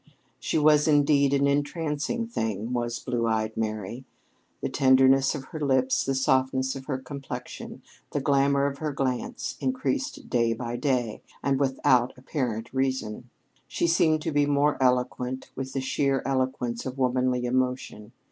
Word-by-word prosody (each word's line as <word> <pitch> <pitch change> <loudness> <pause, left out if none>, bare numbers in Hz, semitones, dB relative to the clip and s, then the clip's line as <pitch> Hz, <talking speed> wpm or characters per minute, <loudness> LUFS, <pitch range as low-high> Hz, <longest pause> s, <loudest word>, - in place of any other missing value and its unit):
She - - -1
was, 150 0 +5
indeed, 145 -2 +4
an 140 0 +3
entrancing 150 +8 -1
thing, 110 - -3
was 120 -1 -1
"Blue 120 -2 -2
eyed 110 -1 0
Mary." 110 +2 -3 0.6
The - - -1
tenderness 135 +1 +4
of 140 - -5
her 155 - -4
lips, 130 -3 +2
the 135 - -1
softness 130 0 +1
of 135 -1 -8
her 135 -2 -2
complexion, 130 -1 -8 0.3
the - - -2
glamour 140 0 +2
of 140 0 -2
her 155 -1 -2
glance 135 - -3
increased 275 +2 -2
day 115 -2 +2
by 120 +1 -4
day, 120 -4 -1 0.2
and 135 -1 +1
without 130 -2 +2
apparent 125 -4 -3
reason. 130 -3 -2 0.4
She - - -1
seemed 160 -2 +3
to 160 - -1
be 145 -1 +2
more 145 0 +2
eloquent, 125 0 0
with 130 0 -5
the 135 - -1
sheer 135 0 0
eloquence 130 -3 -1
of 130 +1 -6
womanly 125 -1 +1
emotion. 125 -3 -2
130 Hz, 150 wpm, -26 LUFS, 125-140 Hz, 0.6 s, was